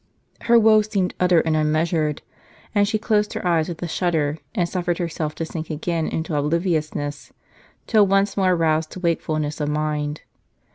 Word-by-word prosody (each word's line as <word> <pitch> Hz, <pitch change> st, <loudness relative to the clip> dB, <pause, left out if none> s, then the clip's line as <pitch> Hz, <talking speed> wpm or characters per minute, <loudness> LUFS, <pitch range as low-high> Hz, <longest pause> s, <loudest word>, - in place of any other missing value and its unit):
Her 235 Hz, 0 st, +4 dB
woe 220 Hz, -1 st, +6 dB
seemed 205 Hz, -4 st, -1 dB
utter 180 Hz, -2 st, +4 dB
and 160 Hz, -1 st, 0 dB
unmeasured; 155 Hz, 0 st, 0 dB, 0.5 s
and 205 Hz, -1 st, +3 dB
she 220 Hz, +1 st, 0 dB
closed 210 Hz, -1 st, 0 dB
her -, -, -5 dB
eyes 170 Hz, -1 st, +2 dB
with 170 Hz, 0 st, -6 dB
a -, -, -2 dB
shudder, 160 Hz, -3 st, 0 dB, 0.2 s
and 175 Hz, -5 st, +1 dB
suffered 175 Hz, -1 st, -2 dB
herself 160 Hz, -3 st, -3 dB
to 165 Hz, -, -3 dB
sink 160 Hz, 0 st, -6 dB
again 160 Hz, +1 st, -2 dB
into 160 Hz, -1 st, -3 dB
obliviousness, 150 Hz, -2 st, -1 dB, 0.5 s
till 215 Hz, -3 st, +4 dB
once 195 Hz, +1 st, +2 dB
more 185 Hz, -2 st, +3 dB
roused 160 Hz, -1 st, +1 dB
to -, -, -7 dB
wakefulness 155 Hz, -3 st, -1 dB
of 145 Hz, -, -1 dB
mind. 150 Hz, 0 st, -2 dB
165 Hz, 165 wpm, -22 LUFS, 155-185 Hz, 0.5 s, woe